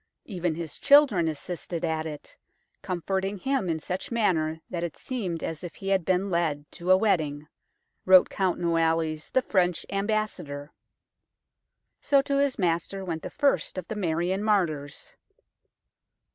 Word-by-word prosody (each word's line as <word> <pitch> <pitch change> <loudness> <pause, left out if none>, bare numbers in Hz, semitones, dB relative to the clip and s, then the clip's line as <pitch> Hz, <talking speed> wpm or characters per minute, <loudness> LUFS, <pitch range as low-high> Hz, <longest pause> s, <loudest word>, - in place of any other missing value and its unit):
Even 180 -5 -2
his 165 -2 -6
children 275 - +5
assisted 170 +2 -4
at 160 -1 -1
it, 150 -2 -9 0.5
comforting 190 +3 -2
him 265 -3 -1
in 160 - 0
such 180 +4 -4
manner 160 -9 +1
that 175 -2 -4
it 170 - -4
seemed 190 -11 -4
as 160 0 -4
if 175 - -7
he 195 - -5
had 190 -2 +2
been 185 +2 0
led 160 -4 0
to 175 +1 -6
a 185 - +8
wedding," 155 -8 0 0.6
wrote 185 -1 +7
Count 190 -2 -1
Noailles, 165 -2 0
the 260 - +3
French 180 -5 +1
Ambassador. 195 -8 -2 1.3
So 280 -1 +3
to 280 0 0
his 280 -2 +1
Master 180 +2 -1
went 165 -3 -3
the - - -6
first 285 -8 0
of 185 - -5
the 220 - -3
Marian 180 0 0
martyrs. 165 -9 -1
180 Hz, 145 wpm, -27 LUFS, 160-200 Hz, 1.3 s, a